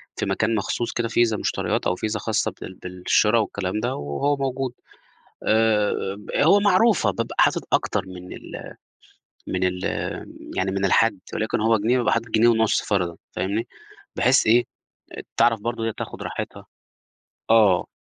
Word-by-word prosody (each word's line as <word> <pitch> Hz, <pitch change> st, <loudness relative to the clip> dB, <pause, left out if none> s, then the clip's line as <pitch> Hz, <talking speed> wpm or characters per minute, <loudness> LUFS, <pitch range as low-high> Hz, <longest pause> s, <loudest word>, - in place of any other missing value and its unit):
في -, -, -2 dB
مكان 110 Hz, +1 st, 0 dB
مخصوص 115 Hz, +3 st, -2 dB
كده 120 Hz, -1 st, -1 dB
فيزا 115 Hz, -1 st, +2 dB
مشتريات -, -, -1 dB
أو 90 Hz, -, +1 dB
فيزا 105 Hz, +3 st, -3 dB
خاصة 110 Hz, 0 st, -1 dB
بال -, -, -7 dB
بالشرا 90 Hz, +5 st, +1 dB
والكلام 100 Hz, -1 st, -2 dB
ده 120 Hz, +4 st, -2 dB
وهو 70 Hz, -, -1 dB
موجود 135 Hz, -2 st, -2 dB, 0.7 s
آآ، 110 Hz, -1 st, +3 dB, 0.3 s
ب 105 Hz, -, -10 dB
هو 200 Hz, -, +5 dB
معروفة 205 Hz, +1 st, +3 dB
بابقى -, -, -4 dB
حاطط -, -, +4 dB
أكتر -, -, +1 dB
من 90 Hz, 0 st, -9 dB
ال -, -, -9 dB, 0.7 s
من 95 Hz, 0 st, -1 dB
ال 90 Hz, 0 st, -1 dB, 0.8 s
يعني 95 Hz, +1 st, 0 dB
من 100 Hz, 0 st, -1 dB
الحد، 100 Hz, +2 st, +3 dB, 0.2 s
وليكن 110 Hz, -1 st, -1 dB
هو 110 Hz, 0 st, +3 dB
جنيه 120 Hz, +5 st, +2 dB
بابقى 120 Hz, -, +1 dB
حاطط 115 Hz, 0 st, 0 dB
جنيه 110 Hz, +2 st, +4 dB
ونُصّ، 110 Hz, -2 st, +3 dB
فرضًا 90 Hz, -4 st, -1 dB, 0.2 s
فاهمني، 105 Hz, +4 st, -2 dB, 0.5 s
بحيث 125 Hz, +1 st, +4 dB
إيه 120 Hz, +2 st, +5 dB, 0.7 s
تعرف 115 Hz, -2 st, +4 dB
برضه 115 Hz, 0 st, -3 dB
هي 115 Hz, -, -1 dB
تاخد -, -, -7 dB
راحتها -, -, -6 dB, 0.8 s
آه. 105 Hz, -5 st, +5 dB
110 Hz, 155 wpm, -23 LUFS, 100-120 Hz, 0.8 s, هو